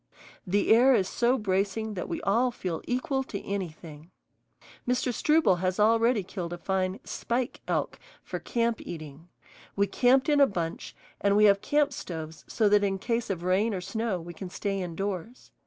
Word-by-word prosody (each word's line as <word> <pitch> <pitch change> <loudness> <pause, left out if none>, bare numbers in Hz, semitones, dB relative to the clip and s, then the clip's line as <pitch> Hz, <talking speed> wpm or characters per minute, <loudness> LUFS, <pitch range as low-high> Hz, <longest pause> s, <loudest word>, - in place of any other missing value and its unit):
The 205 +4 +3
air 255 +3 +6
is 190 -4 +1
so 245 +5 +1
bracing 205 +1 -1
that 180 - -5
we - - -3
all 235 +6 +2
feel 180 -8 -4
equal 255 +2 0
to 200 - -5
anything. 165 -5 -6 0.8
Mr. 250 0 +1
Struble 300 - +3
has 185 +2 -1
already 225 +1 +3
killed 175 -2 -5
a - - -5
fine 190 +3 -1
"spike" 245 0 -3
elk - - -1 0.2
for - - -5
camp 235 -1 -1
eating. 155 -1 -9 0.5
We 200 - +3
camped 255 +6 +3
in 295 -1 +3
a 280 - +7
bunch, 170 -7 -4 0.2
and 200 0 +2
we 210 - +6
have 200 -1 +5
camp 290 -1 +1
stoves 160 -7 -7
so 220 - +1
that 205 0 +4
in 195 -1 0
case 230 +3 -2
of 180 -3 -3
rain 195 +4 +1
or - - -2
snow 220 0 -2
we 170 +1 -9
can 185 +2 -7
stay 195 +1 -3
indoors. 195 +6 -5
200 Hz, 175 wpm, -28 LUFS, 180-235 Hz, 0.8 s, a